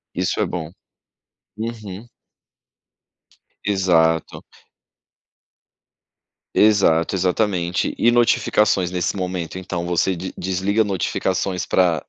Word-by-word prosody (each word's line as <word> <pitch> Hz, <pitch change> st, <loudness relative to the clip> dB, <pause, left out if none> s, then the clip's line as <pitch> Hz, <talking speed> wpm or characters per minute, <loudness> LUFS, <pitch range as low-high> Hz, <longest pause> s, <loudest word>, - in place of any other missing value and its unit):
Isso -, -, -1 dB
é -, -, +2 dB
bom. 80 Hz, -, -5 dB, 0.9 s
Uhum. 110 Hz, -2 st, -6 dB, 1.6 s
Exato. 85 Hz, -5 st, +1 dB, 2.1 s
Exato, 100 Hz, -6 st, +4 dB
exatamente. 90 Hz, -1 st, 0 dB
E 120 Hz, -, +4 dB
notificações 105 Hz, -5 st, +2 dB
nesse 90 Hz, +1 st, -2 dB
momento, 90 Hz, -2 st, -4 dB
então 90 Hz, -2 st, -4 dB
você 90 Hz, +2 st, +1 dB
de 90 Hz, +2 st, -6 dB
desliga 95 Hz, +4 st, 0 dB
notificações 95 Hz, -2 st, -1 dB
pra 85 Hz, -5 st, +2 dB
95 Hz, 85 wpm, -21 LUFS, 85-100 Hz, 2.1 s, Exato